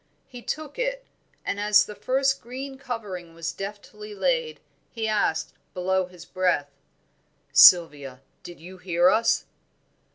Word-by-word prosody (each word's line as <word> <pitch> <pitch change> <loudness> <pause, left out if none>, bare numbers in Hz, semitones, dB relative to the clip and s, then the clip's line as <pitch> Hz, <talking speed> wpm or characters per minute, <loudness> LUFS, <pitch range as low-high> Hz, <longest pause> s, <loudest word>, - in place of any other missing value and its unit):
He 245 -1 -11
took 305 - -6
it, - - -2 0.4
and 200 - -2
as 210 0 +4
the 210 - -9
first 270 +4 0
green 265 +3 -8
covering 200 -10 -7
was 165 0 -4
deftly 210 +1 -9
laid, 485 - -1 0.3
he 225 -2 -4
asked, 165 -7 0 0.2
below 185 0 0
his 180 -2 -14
breath 175 -6 0 0.8
"Sylvia, 145 -7 +6 0.2
did 175 - -11
you 180 +3 -12
hear 175 0 +3
us?" 225 +3 +2
205 Hz, 130 wpm, -25 LUFS, 175-255 Hz, 0.8 s, Sylvia